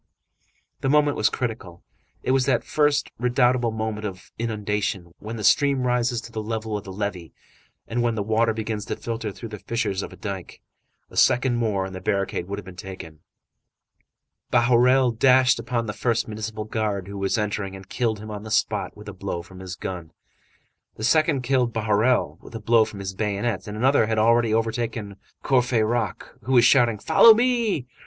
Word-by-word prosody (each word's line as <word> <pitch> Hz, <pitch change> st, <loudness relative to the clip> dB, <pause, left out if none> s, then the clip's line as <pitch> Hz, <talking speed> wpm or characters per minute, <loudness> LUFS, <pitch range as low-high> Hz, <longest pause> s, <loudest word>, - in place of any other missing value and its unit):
The 135 Hz, -, -1 dB
moment 150 Hz, 0 st, +3 dB
was -, -, +2 dB
critical. 110 Hz, -8 st, -5 dB, 0.4 s
It -, -, 0 dB
was 130 Hz, 0 st, +2 dB
that 135 Hz, -, +2 dB
first, 145 Hz, -1 st, +1 dB
redoubtable 125 Hz, 0 st, +2 dB
moment 110 Hz, -1 st, -3 dB
of 95 Hz, -3 st, -7 dB
inundation, 105 Hz, -5 st, -2 dB
when 110 Hz, +3 st, -6 dB
the 110 Hz, -, -6 dB
stream 140 Hz, +2 st, +3 dB
rises 125 Hz, -1 st, +1 dB
to 115 Hz, -, -11 dB
the 110 Hz, -, -4 dB
level 110 Hz, 0 st, -3 dB
of 105 Hz, -, -4 dB
the 95 Hz, -, -7 dB
levee 95 Hz, -6 st, -4 dB, 0.5 s
and 120 Hz, +1 st, -1 dB
when 120 Hz, -1 st, +1 dB
the 105 Hz, -, -1 dB
water 110 Hz, +2 st, +2 dB
begins 110 Hz, -1 st, -4 dB
to -, -, -3 dB
filter 115 Hz, -2 st, -4 dB
through 115 Hz, +3 st, -9 dB
the 105 Hz, -1 st, -8 dB
fissures 100 Hz, -4 st, -2 dB
of -, -, -9 dB
dike. 95 Hz, -3 st, -6 dB, 0.5 s
A -, -, -13 dB
second 125 Hz, -1 st, +3 dB
more 105 Hz, -5 st, 0 dB
and 95 Hz, -, -7 dB
the 95 Hz, -, -7 dB
barricade 100 Hz, -2 st, -1 dB
would 100 Hz, +1 st, -4 dB
have 100 Hz, -, -8 dB
been 95 Hz, -1 st, -11 dB
taken. 90 Hz, -4 st, -9 dB, 1.3 s
Bahorel 125 Hz, +1 st, +4 dB
dashed 130 Hz, -1 st, +5 dB
upon 120 Hz, -2 st, -2 dB
the 105 Hz, -, -4 dB
first 115 Hz, +1 st, 0 dB
municipal 110 Hz, 0 st, -5 dB
guard 105 Hz, -3 st, -2 dB
who 100 Hz, 0 st, -7 dB
was 100 Hz, +3 st, 0 dB
entering, 100 Hz, -2 st, -2 dB
and 95 Hz, 0 st, -11 dB
killed 115 Hz, -1 st, -1 dB
him 110 Hz, +1 st, -8 dB
on 105 Hz, -1 st, -6 dB
the 110 Hz, -, -9 dB
spot -, -, 0 dB
with 105 Hz, 0 st, -12 dB
a 105 Hz, -, -6 dB
blow 95 Hz, -2 st, -5 dB
from 95 Hz, +1 st, -14 dB
his 95 Hz, -1 st, -7 dB
gun; 85 Hz, -4 st, -6 dB, 0.8 s
the 110 Hz, -, -8 dB
second 155 Hz, +2 st, +2 dB
killed 125 Hz, -2 st, +1 dB
Bahorel 110 Hz, +3 st, +1 dB
with -, -, -13 dB
a -, -, -4 dB
blow 110 Hz, +1 st, +4 dB
from 100 Hz, -2 st, -8 dB
his 95 Hz, 0 st, -4 dB
bayonet. 100 Hz, 0 st, -2 dB
Another 115 Hz, +3 st, +2 dB
had 110 Hz, 0 st, -1 dB
already 115 Hz, +1 st, +3 dB
overthrown 110 Hz, -2 st, -2 dB, 0.3 s
Courfeyrac, 120 Hz, -5 st, +1 dB, 0.2 s
who 130 Hz, -, -1 dB
was 120 Hz, -2 st, +6 dB
shouting: 120 Hz, -5 st, +4 dB
"Follow 160 Hz, -, +7 dB
me!" 235 Hz, -, +1 dB
110 Hz, 185 wpm, -24 LUFS, 100-120 Hz, 1.3 s, Follow